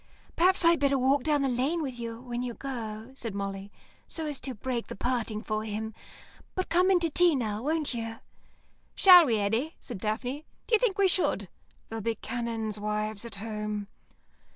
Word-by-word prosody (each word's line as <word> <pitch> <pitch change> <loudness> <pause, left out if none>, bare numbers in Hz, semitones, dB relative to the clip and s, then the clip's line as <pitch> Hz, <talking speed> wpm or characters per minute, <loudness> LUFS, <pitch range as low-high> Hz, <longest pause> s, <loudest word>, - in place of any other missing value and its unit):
"Perhaps 365 +1 +4
I'd 335 0 +6
better 280 -1 +3
walk 265 +2 +3
down 295 -2 +2
the - - +2
lane 265 +7 0
with 255 -4 -5
you 230 -1 -5
when 245 -1 -4
you 245 -2 -4
go," 230 -3 -6
said 230 -6 -6
Molly, 195 0 -4 0.4
"so 320 - -3
as 295 -3 -3
to 260 -1 -4
break 240 +2 -3
the - - -7
parting 230 -2 -2
for 215 0 -2
him. 220 +1 -4 0.6
But 370 - -2
come 360 +2 +4
in 375 -2 +5
to 335 - +2
tea 350 0 +4
now, 215 -4 -2
won't 305 +1 0
you." 225 -1 -4 0.8
"Shall 360 -4 +9
we, 225 -3 +2
Eddy?" 225 +10 0
said 235 -6 -7
Daphne. 245 +9 -3 0.2
"D'you 450 -2 +3
think 440 -4 +1
we 400 -1 +5
should? 365 0 +1 0.4
There'll 225 0 -4
be 230 +2 -1
canons' 225 -2 -3
wives 210 +1 -2
at 235 - -7
home." 210 -1 -4
240 Hz, 185 wpm, -29 LUFS, 215-295 Hz, 0.8 s, Shall